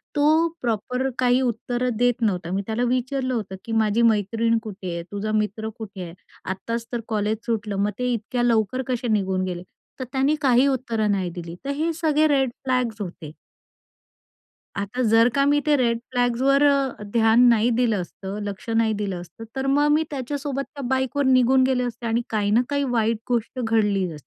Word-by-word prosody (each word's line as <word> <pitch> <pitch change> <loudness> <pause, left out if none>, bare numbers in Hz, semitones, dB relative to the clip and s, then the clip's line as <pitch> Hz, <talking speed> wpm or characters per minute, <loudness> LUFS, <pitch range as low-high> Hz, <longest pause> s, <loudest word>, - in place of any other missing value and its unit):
तो 310 +3 +4
प्रॉपर 250 +3 -1
काही 250 0 +3
उत्तरं 245 0 -1
देत 245 0 +1
नव्हता. 180 -5 0
मी 195 +1 0
त्याला 225 +2 -1
विचारलं 255 +1 -1
होतं 205 -5 -3
की 230 - -6
"माझी 215 +2 +1
मैत्रीण 225 +1 +2
कुठे 190 -4 -6
आहे? 170 0 -4
तुझा 205 +1 -3
मित्र 215 +1 -4
कुठे 205 -4 -8
आहे? 170 -1 -8 0.3
आत्ताच 230 +5 -4
तर 240 -2 -2
कॉलेज 215 -1 0
सुटलं, 215 -3 -2
मग 210 - 0
ते 250 -1 0
इतक्या 240 +2 -2
लवकर 230 +1 +1
कसे 245 -1 -2
निघून 190 -3 0
गेले?" 180 -1 -5 0.4
तर - - -2
त्याने 275 +3 +2
काही 260 -1 +4
उत्तरं 230 -5 0
नाही 190 -3 0
दिली. 170 -1 -7
तर - - -3
हे 320 +3 0
सगळे 310 -1 +2
रेड 270 -3 +2
फ्लॅग्स 250 -4 -1
होते. 170 -5 -7 1.4
आता 205 +6 -3
जर 225 +1 +6
का 275 - +3
मी 290 +1 +3
ते 300 - +4
रेड 235 -2 +1
फ्लॅग्सवर 255 +3 +2
अ, 275 -6 +2
ध्यान 225 0 +4
नाही 230 0 +3
दिलं 225 -6 +2
असतं, 195 +3 -7
लक्ष 200 +2 -6
नाही 225 -1 +2
दिलं 190 -4 -3
असतं, 205 +6 -12
तर 265 0 -2
मग 290 +1 +3
मी 310 +2 +3
त्याच्यासोबत 275 +1 -3
त्या 280 - -7
बाईकवर 265 +2 0
निघून 260 0 +4
गेले 255 -1 +1
असते 235 -1 -5
आणि 230 +1 +1
काही 210 -2 0
ना 235 +3 +5
काही 285 0 0
वाईट 225 0 +1
गोष्ट 240 +1 -1
घडलीच 205 -5 +1
असती. 150 - -12
235 Hz, 185 wpm, -23 LUFS, 210-260 Hz, 1.4 s, जर